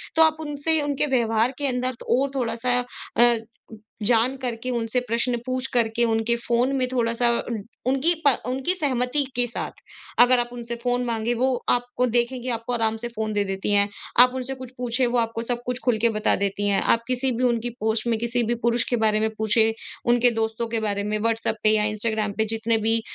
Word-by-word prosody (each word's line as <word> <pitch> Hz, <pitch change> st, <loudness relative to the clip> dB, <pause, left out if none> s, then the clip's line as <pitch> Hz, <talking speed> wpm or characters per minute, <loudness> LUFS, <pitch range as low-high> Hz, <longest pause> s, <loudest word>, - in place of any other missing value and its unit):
तो 320 Hz, -, +4 dB
आप 315 Hz, 0 st, +3 dB
उनसे 300 Hz, +1 st, 0 dB
उनके 290 Hz, 0 st, 0 dB
व्यवहार 225 Hz, +1 st, +1 dB
के 285 Hz, -, 0 dB
अंदर 255 Hz, 0 st, -2 dB
और 270 Hz, +3 st, +2 dB
थोड़ा-सा 245 Hz, 0 st, 0 dB, 0.4 s
अ, 240 Hz, 0 st, +6 dB, 0.7 s
जान 235 Hz, +4 st, +3 dB
करके 250 Hz, -1 st, -4 dB
उनसे 235 Hz, 0 st, -1 dB
प्रश्न 235 Hz, +2 st, +1 dB
पूछ 255 Hz, 0 st, -2 dB
करके 235 Hz, -1 st, +2 dB
उनके 225 Hz, +1 st, +1 dB
फ़ोन 245 Hz, +3 st, +1 dB
में 255 Hz, -1 st, +1 dB
थोड़ा-सा 235 Hz, -1 st, +1 dB, 0.6 s
उनकी 275 Hz, +6 st, +3 dB
पा 280 Hz, -, +8 dB, 0.2 s
उनकी 265 Hz, +7 st, -1 dB
सहमति 275 Hz, -3 st, 0 dB
के 245 Hz, 0 st, +5 dB
साथ, 235 Hz, -, -5 dB, 0.5 s
अगर 245 Hz, +1 st, +6 dB
आप 240 Hz, 0 st, -2 dB
उनसे 235 Hz, -1 st, -6 dB
फ़ोन 245 Hz, 0 st, 0 dB
माँगे 230 Hz, 0 st, -1 dB
वो 260 Hz, +2 st, +1 dB, 0.2 s
आपको 245 Hz, +1 st, +1 dB
देखेंगे 245 Hz, +2 st, 0 dB
आपको 230 Hz, +1 st, -3 dB
आराम 225 Hz, -2 st, 0 dB
से 240 Hz, +2 st, -5 dB
फ़ोन 220 Hz, -2 st, -4 dB
दे 205 Hz, -1 st, +1 dB
देती 195 Hz, +1 st, -2 dB
हैं। 200 Hz, 0 st, +4 dB, 0.3 s
आप 250 Hz, 0 st, +7 dB
उनसे 260 Hz, +1 st, -4 dB
कुछ 255 Hz, -1 st, -10 dB
पूछें 245 Hz, +1 st, 0 dB
वो 240 Hz, +1 st, 0 dB
आपको 230 Hz, 0 st, -2 dB
सब 240 Hz, +1 st, -3 dB
कुछ 250 Hz, 0 st, -2 dB
ख़ुल 245 Hz, -3 st, +2 dB
के 235 Hz, -, +4 dB
बता 215 Hz, -1 st, 0 dB
देती 200 Hz, +1 st, -1 dB
हैं। 200 Hz, -, +2 dB
आप 230 Hz, -, +2 dB
किसी 255 Hz, +1 st, 0 dB
भी 250 Hz, -, -1 dB
उनकी 240 Hz, -1 st, 0 dB
पोस्ट 220 Hz, +1 st, -1 dB
में 230 Hz, -1 st, +1 dB
किसी 235 Hz, +1 st, -1 dB
भी 235 Hz, +1 st, 0 dB
पुरुष 235 Hz, 0 st, +3 dB
के 245 Hz, -, +1 dB
बारे 215 Hz, -1 st, +2 dB
में 220 Hz, +1 st, +1 dB
पूछें 220 Hz, +1 st, +3 dB, 0.4 s
उनके 245 Hz, 0 st, +4 dB
दोस्तों 225 Hz, 0 st, -2 dB
के 225 Hz, 0 st, -1 dB
बारे 205 Hz, -2 st, -2 dB
में 210 Hz, +1 st, -1 dB
व्हाट्सएप 225 Hz, 0 st, 0 dB
पे 215 Hz, -, +6 dB
या 210 Hz, -, +2 dB
इंस्टाग्राम 215 Hz, 0 st, 0 dB
पे 220 Hz, -, +2 dB
जितने 225 Hz, +1 st, 0 dB
भी 225 Hz, +1 st, +1 dB
235 Hz, 205 wpm, -23 LUFS, 225-250 Hz, 0.7 s, पा